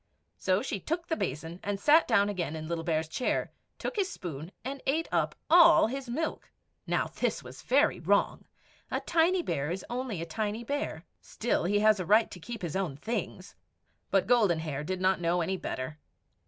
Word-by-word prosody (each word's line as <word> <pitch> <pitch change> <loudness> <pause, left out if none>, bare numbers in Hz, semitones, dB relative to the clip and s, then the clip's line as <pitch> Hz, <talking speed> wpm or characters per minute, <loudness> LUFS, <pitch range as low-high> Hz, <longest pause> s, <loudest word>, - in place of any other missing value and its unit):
So 185 - +1
she 200 - -3
took 335 - -3
the 320 - +1
basin 160 - -4
and 205 -2 -3
sat 300 +8 +5
down 200 -4 +4
again 175 -6 -2
in 155 0 -6
Little 165 0 -2
Bear's 160 -1 0
chair, 245 +10 -1 0.3
took - - -4
his 385 -2 +1
spoon, 165 - -7
and 270 +1 -4
ate 315 +5 +1
up - - +1
all 340 0 +7
his 260 +2 -4
milk. 315 +7 -3 0.4
Now - - +1
this - - 0
was - - -11
very - - +3
wrong. - - +1 0.4
A - - -1
tiny 345 +2 +2
bear 140 - -2
is 180 +2 -4
only 245 -6 -3
a 165 - -3
tiny 210 +6 -3
bear; 280 - -3 0.2
still, 230 -6 -1
he 205 +3 +2
has 215 -1 +5
a 185 - -2
right 215 +2 +4
to 180 - -9
keep 230 +3 -7
his 170 -1 -3
own 180 -8 -2
things. 225 +10 -4 0.6
But - - +3
Golden 215 -9 +4
Hair 150 -2 -4
did 185 +2 -3
not 185 -1 +2
know 175 +1 +1
any 190 +3 -1
better. 150 -4 -5
200 Hz, 195 wpm, -29 LUFS, 165-255 Hz, 0.6 s, all